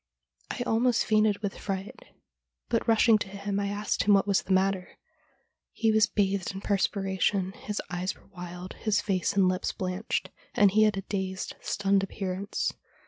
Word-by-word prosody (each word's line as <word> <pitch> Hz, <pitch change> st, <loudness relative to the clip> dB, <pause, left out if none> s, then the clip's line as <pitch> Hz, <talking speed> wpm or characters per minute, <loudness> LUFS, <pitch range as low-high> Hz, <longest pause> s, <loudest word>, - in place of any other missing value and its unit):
I -, -, -3 dB
almost 240 Hz, +1 st, +2 dB
fainted 215 Hz, -1 st, +2 dB
with 200 Hz, -, -3 dB
.fright, 195 Hz, 0 st, -4 dB, 0.7 s
but -, -, 0 dB
rushing 225 Hz, -1 st, +5 dB
to -, -, -3 dB
him 200 Hz, +1 st, -3 dB
I 200 Hz, -, -1 dB
asked 205 Hz, +1 st, -1 dB
him 205 Hz, -1 st, +6 dB
what 195 Hz, -, +3 dB
was 200 Hz, -2 st, +2 dB
the -, -, -7 dB
matter. 190 Hz, 0 st, +1 dB, 0.8 s
He 225 Hz, -1 st, +2 dB
was 215 Hz, 0 st, +4 dB
bathed 195 Hz, -3 st, 0 dB
in 195 Hz, -, -5 dB
perspiration, 195 Hz, -1 st, 0 dB
his 210 Hz, +1 st, -5 dB
eyes 180 Hz, +2 st, -2 dB
were -, -, -22 dB
wild, 180 Hz, -1 st, -8 dB
his 215 Hz, -2 st, 0 dB
face 185 Hz, -4 st, 0 dB
and 195 Hz, -2 st, +4 dB
lips 185 Hz, 0 st, 0 dB
blanched, 185 Hz, +3 st, -3 dB, 0.2 s
and 205 Hz, -2 st, +5 dB
he 215 Hz, +2 st, +5 dB
had 210 Hz, -2 st, +1 dB
a 195 Hz, -, -3 dB
dazed, 190 Hz, -1 st, -3 dB
stunned 195 Hz, -1 st, +1 dB
appearance. 195 Hz, +1 st, -3 dB
200 Hz, 170 wpm, -28 LUFS, 190-210 Hz, 0.8 s, him